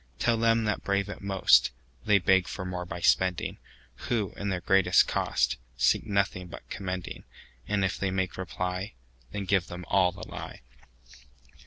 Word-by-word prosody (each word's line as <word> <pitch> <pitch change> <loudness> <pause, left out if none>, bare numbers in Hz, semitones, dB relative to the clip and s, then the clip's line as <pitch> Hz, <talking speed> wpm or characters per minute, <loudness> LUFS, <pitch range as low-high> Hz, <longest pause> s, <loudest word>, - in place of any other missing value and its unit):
Tell 120 - +2
them 115 0 +3
that 105 -2 -1
brave 100 0 0
it - - -7
most, 95 -1 +4 0.4
They 105 -1 +5
beg 95 0 +3
for 95 - -5
more 90 -1 -4
by 85 0 -6
spending, 90 0 +1 0.5
Who, 110 -6 0
in 100 - -3
their 95 -2 -1
greatest 95 0 +4
cost, - - 0 0.2
Seek - - +2
nothing 100 -3 0
but - - -11
commending:And 95 -2 -5
if 95 - -2
they 100 - 0
make 95 -1 -1
reply, 90 -1 -4 0.4
Then 100 -1 -4
give 95 -1 +1
them 90 0 -8
all 90 -2 +3
the - - -10
lie. - - -8
95 Hz, 160 wpm, -28 LUFS, 90-100 Hz, 0.5 s, They